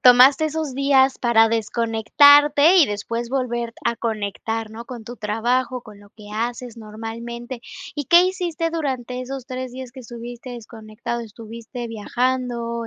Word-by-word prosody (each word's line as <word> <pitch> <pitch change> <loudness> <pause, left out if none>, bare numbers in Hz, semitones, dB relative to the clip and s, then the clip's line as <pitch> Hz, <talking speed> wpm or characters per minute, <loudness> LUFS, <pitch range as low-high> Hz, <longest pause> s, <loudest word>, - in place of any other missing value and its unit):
tomaste 255 +4 +7
esos 310 -2 -2
días 270 0 +3
para 225 -2 +4
desconectarte 285 - +5
y 335 -6 +7
después 230 +3 -4
volver 240 -3 -2
a 235 - +1
conectar, 225 0 -3
¿no? 230 +2 -8
Con 240 -2 -8
tu 240 +2 -9
trabajo, 240 +4 -1
con 210 -3 -13
lo 205 0 -18
que 210 -1 -14
haces 235 +2 -4
normalmente, 230 +3 -7 0.4
¿y 290 - -2
qué 345 +4 +7
hiciste 355 -3 -1
durante 260 -6 -3
esos 260 0 -6
3, 255 -1 -5
días 260 -1 -8
que 260 - -13
estuviste 240 +1 -9
desconectado? 235 0 -6
¿Estuviste 230 +2 -8
viajando, 235 +1 -2
240 Hz, 145 wpm, -22 LUFS, 225-260 Hz, 0.4 s, tomaste